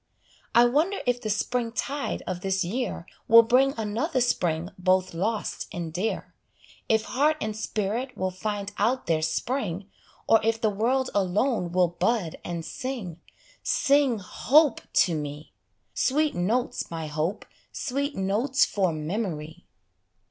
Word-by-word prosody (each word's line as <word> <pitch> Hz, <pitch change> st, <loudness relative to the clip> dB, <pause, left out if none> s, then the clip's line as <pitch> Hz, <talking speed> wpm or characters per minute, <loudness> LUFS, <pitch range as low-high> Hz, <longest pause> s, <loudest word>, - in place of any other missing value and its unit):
I 240 Hz, +1 st, +8 dB
wonder 310 Hz, +11 st, +2 dB
if 245 Hz, 0 st, +1 dB
the 220 Hz, -, -3 dB
spring 230 Hz, +2 st, -1 dB
tide 280 Hz, +4 st, -3 dB
of 180 Hz, -1 st, -4 dB
this 190 Hz, 0 st, 0 dB
year 220 Hz, -2 st, -3 dB, 0.2 s
Will 230 Hz, +1 st, +9 dB
bring 260 Hz, +4 st, +3 dB
another 230 Hz, +8 st, -1 dB
spring 175 Hz, -7 st, 0 dB
both 185 Hz, 0 st, +2 dB
lost 210 Hz, +6 st, -2 dB
and 170 Hz, -3 st, -5 dB
dear; 195 Hz, +6 st, -2 dB, 0.6 s
If 220 Hz, -1 st, +3 dB
heart 295 Hz, +6 st, +1 dB
and 215 Hz, 0 st, -3 dB
spirit 220 Hz, +4 st, -3 dB
will 185 Hz, 0 st, -1 dB
find 205 Hz, +1 st, -4 dB
out 245 Hz, +6 st, +1 dB
their 160 Hz, -2 st, +1 dB
spring, 195 Hz, +3 st, -2 dB, 0.4 s
Or 225 Hz, -, +6 dB
if 225 Hz, 0 st, +1 dB
the 220 Hz, -2 st, +1 dB
world 255 Hz, +6 st, 0 dB
alone 200 Hz, 0 st, +1 dB
will 180 Hz, -1 st, +3 dB
bud 175 Hz, 0 st, -1 dB
and 170 Hz, -2 st, -4 dB
sing: 240 Hz, -, -5 dB, 0.4 s
Sing, 275 Hz, -4 st, +3 dB
hope, 280 Hz, -, +3 dB
to 175 Hz, -, +3 dB
me! 150 Hz, 0 st, -5 dB, 0.4 s
Sweet 300 Hz, +3 st, +1 dB
notes, 220 Hz, +8 st, -1 dB
my 165 Hz, -1 st, -4 dB
hope, 155 Hz, +5 st, -2 dB, 0.3 s
sweet 280 Hz, +1 st, -2 dB
notes 215 Hz, +9 st, +2 dB
for 190 Hz, -4 st, 0 dB
memory. 160 Hz, -1 st, -4 dB
215 Hz, 140 wpm, -26 LUFS, 180-250 Hz, 0.6 s, Will